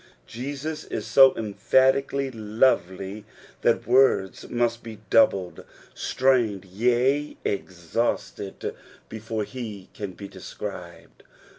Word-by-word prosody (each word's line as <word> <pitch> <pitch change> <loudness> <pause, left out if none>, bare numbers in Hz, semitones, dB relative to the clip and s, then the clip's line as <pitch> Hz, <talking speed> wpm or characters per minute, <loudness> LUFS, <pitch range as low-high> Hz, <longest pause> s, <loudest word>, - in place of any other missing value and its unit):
Jesus 145 - -5
is - - -5
BO 135 -1 +8
emphatically 130 +6 +2
lovely 105 -3 0 0.4
that - - +2
words 130 -8 +3
must 120 -1 0
be 110 -2 -9
doubled, 95 -5 +3 0.3
strained, 120 -7 +1
yea, 125 +9 +1
exhausted 95 +2 -3 0.4
before 110 0 -4
he 105 -5 -7
can 100 -3 -6
be 100 +2 -9
described. - - -9
115 Hz, 95 wpm, -25 LUFS, 100-130 Hz, 0.4 s, BO